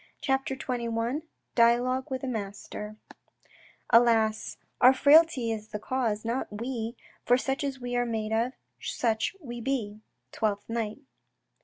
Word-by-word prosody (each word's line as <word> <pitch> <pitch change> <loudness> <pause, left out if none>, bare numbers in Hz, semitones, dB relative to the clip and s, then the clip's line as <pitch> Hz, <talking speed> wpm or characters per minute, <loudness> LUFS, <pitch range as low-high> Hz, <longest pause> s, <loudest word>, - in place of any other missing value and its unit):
CHAPTER 270 -1 0
XXI 240 +1 -2 0.3
DIALOGUE 245 +2 +3
WITH 260 -1 -3
A - - -2
MASTER 210 -1 -5 1.0
Alas, 225 -2 +4 0.2
our 255 +2 +8
frailty 285 -4 +5
is 215 -1 -4
the 210 - -5
cause, 225 -2 -1
not 235 +3 -1
we; 230 +1 -4 0.3
For 245 - +4
such 270 +2 -2
as 275 -2 -3
we 245 0 -4
are 245 - +2
made 220 -1 -2
of, 235 +3 +1 0.3
such 225 - -1
we 240 -7 -7
be. 225 -5 -2 0.2
— - - -50
Twelfth 205 -2 -1
Night. 225 +2 -3
235 Hz, 140 wpm, -28 LUFS, 220-260 Hz, 1.0 s, our